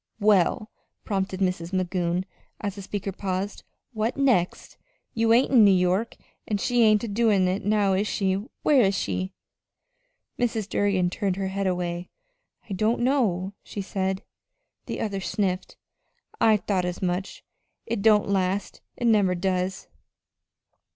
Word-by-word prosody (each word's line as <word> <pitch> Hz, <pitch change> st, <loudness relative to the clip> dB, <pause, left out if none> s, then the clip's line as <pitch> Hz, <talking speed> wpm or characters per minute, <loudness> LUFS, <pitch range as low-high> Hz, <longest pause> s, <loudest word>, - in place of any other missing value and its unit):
"Well," 210 Hz, 0 st, +2 dB, 0.3 s
prompted 195 Hz, -1 st, -2 dB
Mrs. 180 Hz, -2 st, -1 dB
Magoon, 180 Hz, -1 st, 0 dB, 0.3 s
as 205 Hz, -2 st, -3 dB
the 200 Hz, -, -8 dB
speaker 195 Hz, 0 st, -4 dB
paused. 190 Hz, +1 st, -4 dB, 0.3 s
"What 220 Hz, +3 st, -1 dB
next? 245 Hz, -11 st, +1 dB, 0.4 s
You 225 Hz, 0 st, +2 dB
ain't 245 Hz, +4 st, +4 dB
in 245 Hz, -5 st, +7 dB
New 205 Hz, -, +7 dB
York, 185 Hz, +4 st, +1 dB, 0.3 s
an' 210 Hz, -, 0 dB
she 240 Hz, +4 st, +1 dB
ain't 215 Hz, -1 st, +5 dB
a -, -, -2 dB
doin' 205 Hz, -3 st, +2 dB
it 185 Hz, +3 st, -1 dB
now, 205 Hz, -1 st, +2 dB
is 200 Hz, +3 st, +1 dB
she? 195 Hz, -2 st, 0 dB, 0.3 s
Where 285 Hz, -4 st, +5 dB
is 195 Hz, -3 st, +2 dB
she?" 185 Hz, -1 st, -3 dB, 1.0 s
Mrs. 225 Hz, -4 st, 0 dB
Durgin 190 Hz, -4 st, +1 dB
turned 195 Hz, -1 st, -1 dB
her 195 Hz, 0 st, -2 dB
head 195 Hz, 0 st, -2 dB
away. 175 Hz, -1 st, -2 dB, 0.6 s
"I 200 Hz, -, -5 dB
don't 215 Hz, +5 st, +1 dB
know," 210 Hz, -8 st, +1 dB
she 200 Hz, -, -6 dB
said. 190 Hz, 0 st, -2 dB, 0.6 s
The -, -, -4 dB
other 200 Hz, -3 st, -2 dB
sniffed. 190 Hz, -1 st, -2 dB, 0.6 s
"I 220 Hz, -1 st, +5 dB
thought 190 Hz, -1 st, -1 dB
as 180 Hz, +1 st, -4 dB
much. 180 Hz, +2 st, -3 dB, 0.4 s
It 225 Hz, -3 st, -2 dB
don't 210 Hz, -1 st, +4 dB
last 195 Hz, 0 st, -1 dB, 0.2 s
it 240 Hz, -, -3 dB
never 205 Hz, -5 st, +4 dB
does." 185 Hz, +1 st, -2 dB
195 Hz, 145 wpm, -25 LUFS, 185-215 Hz, 1.0 s, in